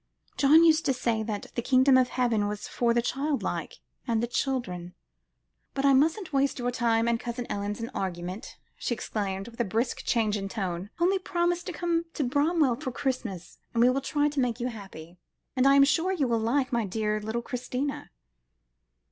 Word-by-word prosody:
"John 300 +4 +6
used 320 -1 +5
to 270 - +3
say 235 -3 0
that 215 -2 -5
the 235 - -1
Kingdom 260 +2 +4
of 255 -1 +4
Heaven 235 -5 +1
was 210 0 -5
for 235 -1 +1
the 235 0 +2
child 280 +3 -1
like, - - -3 0.3
and 230 -2 +1
the 235 - +1
children. 195 -9 -3 0.8
But 275 0 0
I 275 - +6
mustn't 315 +6 +2
waste 275 0 +2
your 245 -1 -1
time 230 -2 +1
and 235 -1 +1
Cousin 240 0 -4
Ellen's 205 +1 -3
in 230 +1 -4
argument," 180 -1 -5 0.2
she 240 - -2
exclaimed, 195 -3 -3
with 230 - -17
a - - +3
brisk 230 +4 -1
change 215 -3 +1
of 195 -1 -4
tone; 190 -2 -4
"only 375 +3 +3
promise 350 -1 0
to 375 - -4
come 340 -1 -1
to 295 - 0
Bramwell 285 0 +2
for 260 - -4
Christmas, 245 - -4 0.2
and 230 - +4
we 250 - +6
will 270 +2 -1
try 290 +2 +1
to 295 -1 -2
make 245 -2 0
you 245 +1 -1
happy. 180 -6 -10 0.4
And 260 +1 +4
I 275 - +6
am 280 - +7
sure 325 +6 +2
you 310 -8 0
will 230 -1 +1
like 255 +4 0
my 235 -1 +2
dear 215 +1 -1
little 220 +3 -3
Christina." 255 +3 -4
245 Hz, 200 wpm, -27 LUFS, 220-275 Hz, 0.8 s, am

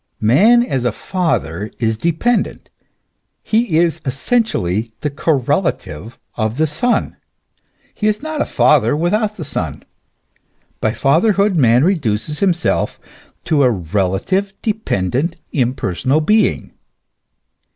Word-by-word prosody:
Man 205 - +5
as 135 - -2
a 120 - +1
father 105 - -2
is 110 -2 0
dependent, 170 - -1 0.7
he 220 -7 +1
is 170 -1 +1
essentially 130 - -1
the 150 -2 -2
correlative 120 - -1 0.2
of 110 +1 -2
the 160 - +3
son; 165 +12 -1 0.8
he 215 - -1
is 215 +4 0
not 315 -1 -3
a - - -1
father 150 0 +3
without 210 +6 0
the - - -5
son; - - -4 1.0
by - - 0
fatherhood 205 -3 +2
man 125 -4 +4
reduces 150 - 0
himself 175 -4 0 0.4
to 155 -4 +1
a 130 - +5
relative, 100 - -1
dependent, 165 - -1 0.2
impersonal 130 - 0
being. 210 +8 +1
150 Hz, 110 wpm, -17 LUFS, -, 1.0 s, Man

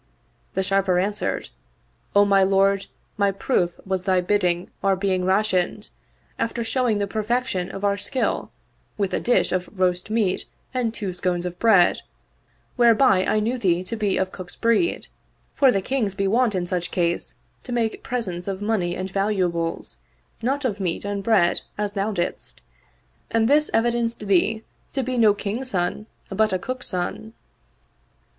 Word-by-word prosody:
The 190 - +1
Sharper 195 -1 +2
answered, 200 - -1 0.3
" - - -39
O 205 0 +7
my 200 -1 +4
lord, 195 +1 +3 0.3
my 200 -1 +3
proof 190 -3 0
was 190 -1 -2
thy 185 -2 +3
bidding 180 -2 0
our 195 -1 +3
being 185 -1 0
rationed, 190 0 +1 0.5
after 230 +1 -1
showing 230 -1 +1
the 205 - 0
perfection 215 -3 -1
of 195 +1 -7
our 200 0 +2
skill, 260 +5 -1 0.5
with 200 -3 -1
a - - +1
dish 245 - +2
of 180 0 -1
roast 180 +1 +1
meat 215 -4 0 0.3
and 250 -3 0
two 200 -5 -4
scones 180 0 -1
of 175 0 -5
bread; 205 -6 +4 0.8
whereby 230 -5 +5
I 215 - +2
knew 235 +4 -1
thee 180 -4 +1
to 185 +5 -4
be 210 -3 0
of 190 0 -1
cook's 185 -2 -7
breed, 230 +9 +1 0.5
for 270 -3 +5
the 195 -4 0
Kings 225 -7 -1
be 195 0 0
wont 230 +1 +2
in 180 -1 -1
such 175 -1 -2
case 170 -1 -1 0.3
to 255 - -9
make 230 -2 -1
presents 190 -8 -4
of 195 -1 -3
money 205 -5 0
and 185 +1 -3
valuables, 185 -4 -1 0.4
not 270 +4 -1
of 210 -5 -1
meat 180 0 -2
and 205 0 -2
bread 195 -5 +3 0.2
as 205 -1 -2
thou 200 +1 -1
didst, 175 -4 -3 0.7
and 225 0 +2
this 300 +3 +4
evidenced 235 -1 0
thee 205 +3 +2 0.3
to 270 - 0
be 250 0 -1
no 215 -3 +5
king's 220 +6 -3
son, 180 +2 -1 0.2
but 215 +3 +2
a - - +2
cook's 255 +6 -5
son." 185 +5 -3
200 Hz, 165 wpm, -23 LUFS, 185-225 Hz, 0.8 s, O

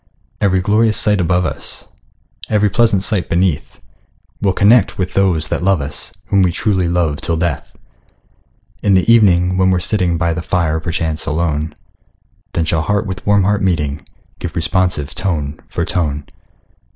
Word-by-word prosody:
Every 95 -2 +2
glorious 105 +3 +2
sight 105 -3 +3
above 90 +1 +1
us, - - -5 0.6
Every 105 -1 +2
pleasant 110 -4 +2
sight 100 -4 -1
beneath, 85 -3 -1 0.6
We'll 95 -2 +1
connect 110 +4 +4
with 90 -1 -3
those 85 -6 +1
that - - -2
love 95 -2 +3
us, 70 +1 -5 0.2
Whom 100 - +3
we 90 -2 +3
truly 95 -1 0
love 85 -4 0
till 85 - -1
death! 85 +1 -2 1.1
In 100 -2 +3
the 95 - +2
evening, 90 -5 +4
when 95 0 +3
we're 90 - +2
sitting 90 -2 0
By 85 0 0
the 85 - -4
fire, 80 -2 0
perchance 80 -1 -3
alone, 75 0 -1 0.8
Then 85 - 0
shall 80 -1 0
heart 105 +5 0
with 95 0 -6
warm 100 -1 +4
heart 100 +1 +1
meeting, 75 -6 -1 0.4
Give - - -6
responsive 85 -3 0
tone 75 -6 -3
for - - -2
tone. 75 -4 -2
90 Hz, 160 wpm, -17 LUFS, 80-100 Hz, 1.1 s, connect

